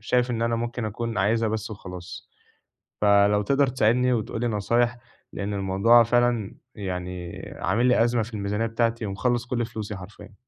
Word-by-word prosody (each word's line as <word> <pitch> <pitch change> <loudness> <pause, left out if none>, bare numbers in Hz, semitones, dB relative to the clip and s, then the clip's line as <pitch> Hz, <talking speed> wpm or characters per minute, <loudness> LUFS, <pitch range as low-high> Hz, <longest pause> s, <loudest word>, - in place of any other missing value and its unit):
شايف 125 +3 +1
إن 115 -1 -1
أنا 115 0 +1
ممكن 120 0 -3
أكون 115 0 -3
عايزها 110 +3 +2
بس 110 0 -3
وخلاص، 90 -3 -9 0.7
فلو 100 0 +4
تقدر 140 +6 +2
تساعدني 125 +1 +2
وتقول 115 0 -2
لي 120 - +1
نصايح، 120 +3 +1 0.4
لأن 100 +1 -3
الموضوع 100 +5 +4
فعلًا 120 -3 +1 0.2
يعني 90 -3 -5 0.2
عامل 110 +7 +1
لي 125 -2 +4
أزمة 120 -1 +1
في 115 - -10
الميزانية 105 +2 -1
بتاعتي 115 0 -1
ومخلص 120 +4 -1
كل 120 -1 -1
فلوسي 110 -3 -6
حرفيًا. 95 +3 -12
110 Hz, 160 wpm, -25 LUFS, 100-120 Hz, 0.7 s, فلو